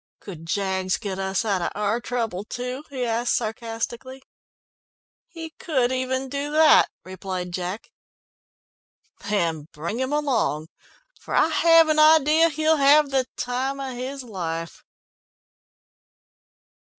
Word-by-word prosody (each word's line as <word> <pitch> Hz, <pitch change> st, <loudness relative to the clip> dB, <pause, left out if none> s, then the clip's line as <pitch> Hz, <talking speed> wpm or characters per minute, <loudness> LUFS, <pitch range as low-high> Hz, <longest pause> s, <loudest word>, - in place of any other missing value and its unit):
"Could 165 Hz, -5 st, -10 dB
Jaggs 190 Hz, 0 st, -1 dB
get 195 Hz, -2 st, -5 dB
us 190 Hz, +3 st, -1 dB
out 195 Hz, -4 st, 0 dB
of -, -, -2 dB
our 210 Hz, +3 st, -1 dB
trouble 225 Hz, -6 st, -3 dB
too?" 250 Hz, +5 st, -5 dB
he 260 Hz, -3 st, -3 dB
asked 235 Hz, +1 st, 0 dB
sarcastically. 230 Hz, +3 st, -4 dB, 1.0 s
"He 330 Hz, -1 st, -9 dB
could 260 Hz, -7 st, 0 dB
even 260 Hz, +1 st, -2 dB
do 280 Hz, +2 st, -4 dB
that," 310 Hz, 0 st, +6 dB, 0.2 s
replied 185 Hz, -1 st, -5 dB
Jack. 185 Hz, +4 st, -5 dB, 1.4 s
"Then 165 Hz, -7 st, -1 dB
bring 170 Hz, +10 st, -5 dB
him 260 Hz, +1 st, -2 dB
along, 240 Hz, -, 0 dB, 0.5 s
for -, -, -5 dB
I -, -, +4 dB
have 330 Hz, 0 st, +5 dB
an 310 Hz, 0 st, +2 dB
idea 315 Hz, +1 st, +5 dB
he'll 315 Hz, +1 st, +1 dB
have 285 Hz, +1 st, +5 dB
the 265 Hz, -2 st, +1 dB
time 260 Hz, +3 st, -2 dB
of 265 Hz, -2 st, -5 dB
his 260 Hz, +2 st, -5 dB
life." 165 Hz, -, -5 dB
245 Hz, 125 wpm, -24 LUFS, 195-280 Hz, 1.4 s, that